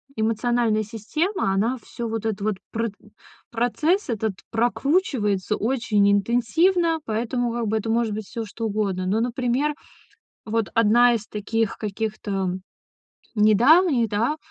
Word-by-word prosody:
эмоциональная 225 0 +1
система, 230 - -2
она 230 +7 +1
всё 235 -2 -6
вот 225 -1 -4
этот 215 -2 -2
вот 210 -1 0 0.2
прытн 225 -2 -4 0.4
процесс 280 - 0
этот 220 -2 -1 0.2
прокручивается 230 - +1
очень 225 -4 +1
интенсивно, 320 - +2
поэтому, 235 +2 -1
как 235 -2 -2
бы, 220 +1 +1
это 220 +1 -3
может 225 -1 +1
быть 215 0 -5
всё 230 -1 -5
что 225 +2 -6
угодно. 200 -3 -1
Но, 210 +4 +1
например, 250 +4 0 0.7
вот 225 -1 -1
1 235 +2 +5
из 215 -2 -3
таких 215 +1 -2
каких-то, 210 0 -4
м, 190 -1 -2 0.7
недавних, 240 - +5
да, 230 +9 0
225 Hz, 130 wpm, -23 LUFS, 210-245 Hz, 0.7 s, 1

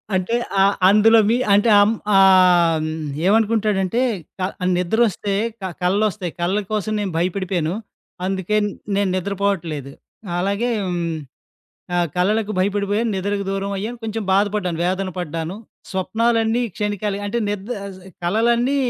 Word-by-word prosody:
అంటే, 185 +5 0 0.2
ఆహ్, 195 +1 +4
అందులో 220 +3 +6
మీ 235 - +3 0.2
అంటే 205 +3 +4
అమ్ 205 - +4 0.2
ఆహ్, 180 -3 +5
హ్మ్, 155 - -2 0.4
ఏమనుకుంటాడంటే, 215 -1 +2 0.4
క - - -5 0.4
నిద్రొస్తే 200 +2 0 0.3
క - - -9 0.2
కలలొస్తాయి. 190 -1 0
కలల 185 +4 +1
కోసం 215 0 -1
నేను 200 -3 -2
భయపడిపోయాను. 180 -1 -1 0.5
అందుకే 190 +2 -1 0.4
నేను 200 -1 +1
నిద్రపోవట్లేదు. 185 -7 -2 0.5
అలాగే 200 +6 0 0.2
హ్మ్, 175 -2 -2 0.8
ఆహ్, 175 -1 +2
"కలలకు 210 +4 +1
భయపడిపోయాను, 205 +3 0
నిద్రకు 200 +1 -2
దూరం 195 0 -2
అయ్యాను. 220 +5 -4
కొంచెం 220 -1 -3
బాధపడ్డాను, 200 -3 +1
వేదన 185 +1 -1
పడ్డాను. 165 +1 -4 0.4
స్వప్నాలన్నీ 225 +5 +1
క్షణికాలె" 205 -1 -2
అంటే 205 +4 -1
నిద్ 205 +1 -4
ఆహ్, 195 -2 -8
ఆహ్, 190 - -13
కలలన్నీ 235 +7 +2
200 Hz, 125 wpm, -21 LUFS, 185-215 Hz, 0.8 s, అందులో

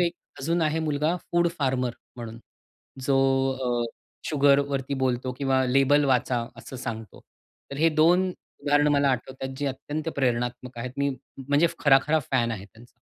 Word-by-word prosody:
एक 170 -1 +2 0.3
अजून 165 +5 0
आहे 155 0 +1
मुलगा 155 +2 0 0.2
फूड 175 0 +3
फार्मर 130 -3 0 0.2
म्हणून 115 -1 -7 0.7
जो 135 0 +2 0.4
अ, 120 -2 0 0.4
शुगरवरती 140 -2 +2
बोलतो 130 -1 0
किंवा 135 -1 +2
लेबल 135 +3 +4
वाचा 125 -2 +1
असं 130 - -9
सांगतो. 115 -4 -6 0.5
तर 140 - -6
हे 160 +3 +4
2 180 +4 +5 0.3
उदाहरण 145 +1 +3
मला 140 -1 +3
आठवतात 130 +1 -3
जे 145 - -1
अत्यंत 145 +4 -4
प्रेरणात्मक 120 -1 -1
आहेत. 125 +2 -4
मी 140 0 +1 0.4
म्हणजे 145 +4 +4
खरा, 135 -2 +6
खरा 160 +1 +3
फॅन 120 -3 +2
आहे 100 -3 -6
त्यांचा. 115 +4 -19
135 Hz, 150 wpm, -26 LUFS, 125-145 Hz, 0.7 s, खरा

